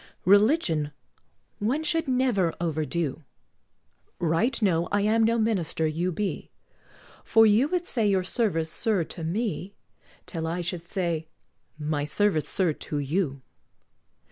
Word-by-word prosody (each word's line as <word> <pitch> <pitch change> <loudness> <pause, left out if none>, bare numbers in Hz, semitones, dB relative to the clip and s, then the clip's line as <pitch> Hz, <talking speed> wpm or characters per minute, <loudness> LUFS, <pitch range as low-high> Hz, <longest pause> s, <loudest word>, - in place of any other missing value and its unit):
Religion 200 - +3 0.7
one 250 +9 0
should 325 0 0
never 250 -10 +1
overdo: 160 -2 -2 0.9
Right 170 +10 +1
know 175 -6 +2
I 205 - +2
am 220 +2 +3
no 230 +1 +3
minister 195 -8 0
you 165 +4 0
be, 200 +3 -3 0.7
For 225 0 +5
you 220 +6 +4
would 355 +2 -1
say 230 - +1
your 190 -2 +2
service, 180 -6 -1
sir, 210 -6 0
to 165 +1 -8
me, 200 +2 -2 0.5
Till 160 -3 -4
I 170 +2 -2
should 175 -1 -4
say, 170 -4 -2 0.5
"My 150 -1 -1
service, 155 -1 +1
sir, 180 -5 +1
to 150 - -5
you." 140 -2 -1
185 Hz, 130 wpm, -26 LUFS, 160-220 Hz, 0.9 s, For